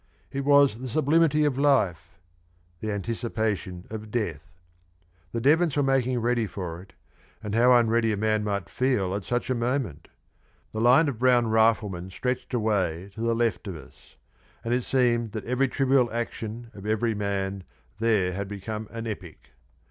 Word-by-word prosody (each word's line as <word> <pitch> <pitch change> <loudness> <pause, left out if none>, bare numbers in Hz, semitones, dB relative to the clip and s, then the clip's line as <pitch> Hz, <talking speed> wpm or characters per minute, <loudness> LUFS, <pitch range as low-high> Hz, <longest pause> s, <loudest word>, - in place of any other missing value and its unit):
It 140 0 -3
was 140 -5 +5
the 130 0 -5
sublimity 155 +3 +3
of 135 -2 0
life 100 - +1 0.6
the 110 - -3
anticipation 105 -3 -3
of 110 -1 -6
death. 100 -7 -3 0.8
The 115 - -2
Devons 150 +4 +3
were 145 - +3
making 130 -2 +1
ready 120 -1 +1
for 90 -4 -6
it, 95 - -17 0.5
and 105 -1 -4
how 125 +3 +5
unready 115 -1 +3
a 105 - -1
man 110 0 +1
might 100 -2 -2
feel 125 -8 0
at 100 0 -3
such 120 +1 -1
a - - +3
moment! 120 - -2 0.6
The 110 - -3
line 125 +7 +5
of 130 -6 -3
brown 120 -2 +3
riflemen 110 -5 +2
stretched 125 +6 -3
away 100 -5 -1
to 110 - -8
the 115 0 +1
left 115 -3 0
of 95 - -4
us, 75 - -15 0.5
and 115 - -1
it 125 0 +1
seemed 120 -4 +1
that 110 - -5
every 125 +3 +1
trivial 135 -2 +2
action 115 0 -5
of 100 0 -9
every 110 +1 +1
man 100 -2 -2 0.4
there 105 -5 +2
had 100 +2 -4
become 105 +2 -6
an 115 0 -6
epic. 95 -7 -8
115 Hz, 165 wpm, -26 LUFS, 100-125 Hz, 0.8 s, was